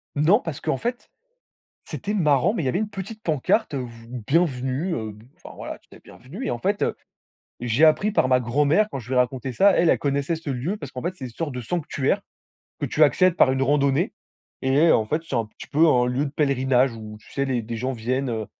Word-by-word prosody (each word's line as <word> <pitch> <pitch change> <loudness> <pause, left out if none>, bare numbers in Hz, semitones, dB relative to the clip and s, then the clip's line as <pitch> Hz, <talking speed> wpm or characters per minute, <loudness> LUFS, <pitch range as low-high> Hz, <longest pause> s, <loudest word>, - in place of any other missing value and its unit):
Non, 160 +9 +4
parce 165 - -6
qu'en - - -1
fait, 240 - -4 0.7
c'était 205 0 -4
marrant, 150 - +3
mais 215 - -1
il - - -2
y - - +2
avait 130 - 0
une 215 0 -1
petite 210 +3 -7
pancarte, 155 - +1
heu, - - -1
vous 115 -2 -9 0.2
«bienvenue», 145 +1 0
heu, 110 -2 -4
b 105 +1 -16
enfin - - -12
voilà, - - -7
tu - - -33
était - - -16
bienvenu. 175 - -10
Et - - -1
en 120 - -2
fait, 205 - -1
heu, - - 0 0.7
j'ai 120 +6 +3
appris 195 +7 +3
par 130 - +2
ma 130 -1 +4
grand-mère 145 - +2
quand 135 - -5
je 115 - -12
lui 130 - -3
ai - - +3
raconté 125 +1 0
ça. 200 - +5
Elle 170 -2 +3
elle - - +4
connaissait 140 +3 0
ce 160 -2 -7
lieu 135 +10 -2
parce 145 -8 -8
qu'en 125 - -6
fait, 180 +5 -3
c'est 135 - -7
une - - -6
sorte 145 +4 -4
de 125 - -4
sanctuaire 145 0 -1 0.6
que - - -1
tu 155 - +1
accèdes 175 +5 +3
par 130 - +5
une 135 0 0
randonnée. 140 0 +2 0.5
Et 140 +5 +4
en 110 - +2
fait, 155 +8 -1
c'est - - -5
un 115 -2 0
petit - - -13
peu 160 +3 +4
un 125 -4 +4
lieu 125 +4 0
de - - -5
pèlerinage 135 -3 +2
où 110 -1 -9
tu - - -18
sais? 140 - 0
Les 125 -3 -1
des 115 +1 -5
gens 130 +4 -2
viennent, 130 +3 -2
heu, 110 -3 -3
140 Hz, 245 wpm, -24 LUFS, 125-165 Hz, 0.7 s, ça